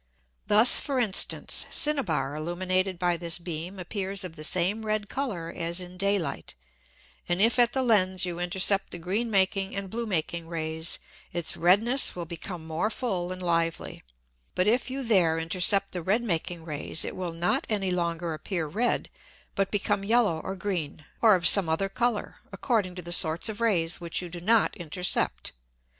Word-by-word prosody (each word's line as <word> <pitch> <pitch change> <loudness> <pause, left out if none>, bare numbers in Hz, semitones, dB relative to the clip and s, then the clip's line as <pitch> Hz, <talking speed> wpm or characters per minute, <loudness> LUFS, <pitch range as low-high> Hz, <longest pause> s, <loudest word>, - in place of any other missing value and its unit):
Thus, 215 +4 +7
for 275 -2 -2
instance, 215 -6 0
Cinnaber 190 - 0
illuminated 185 +3 -1
by 175 -1 +1
this 170 0 0
beam 175 +2 -6
appears 195 +1 -4
of 175 -3 -7
the 155 - -8
same 185 +7 +1
red 215 -1 -2
Colour 195 -12 -3
as 170 +1 -3
in 180 0 -9
Day 200 +2 +1
light; 165 -7 -5 0.7
and 175 +1 +1
if 230 +4 +3
at 240 -1 +5
the 265 - +1
Lens 190 -6 +3
you 175 -1 -4
intercept 190 +3 +2
the - - -5
green 195 +8 -2
making 195 -1 +1
and 195 -1 -5
blue 235 0 -3
making 170 -3 -2
Rays, 160 0 -3 0.3
its 170 -2 0
redness 215 +10 +3
will 175 -1 -5
become 170 0 -7
more 160 +6 -1
full 190 -8 -2
and 185 0 -5
lively: 165 -1 -1 0.5
But 180 - +2
if 245 +4 +2
you 270 +1 -4
there 180 -9 +3
intercept 185 +4 +2
the 180 - -3
red 205 +8 +1
making 170 -4 -3
Rays, 150 0 0
it - - -5
will 180 -2 -4
not 170 +2 0
any 195 -4 0
longer 170 -1 -2
appear 170 +1 -3
red, 220 +11 0 0.5
but 195 -1 0
become 205 -1 0
yellow 210 -6 +2
or 190 +4 -5
green, 170 -6 -4 0.2
or 220 -3 +7
of 170 -2 +3
some 195 -5 +7
other 180 +5 0
Colour, 235 0 -1
according 205 -7 -1
to 180 - -6
the 175 - -7
sorts 165 +3 +2
of 215 +1 -6
Rays 180 -5 +1
which 170 -1 -2
you 180 - -6
do 175 0 -8
not 225 +4 +3
intercept. 170 - -1
185 Hz, 180 wpm, -27 LUFS, 170-205 Hz, 0.7 s, Thus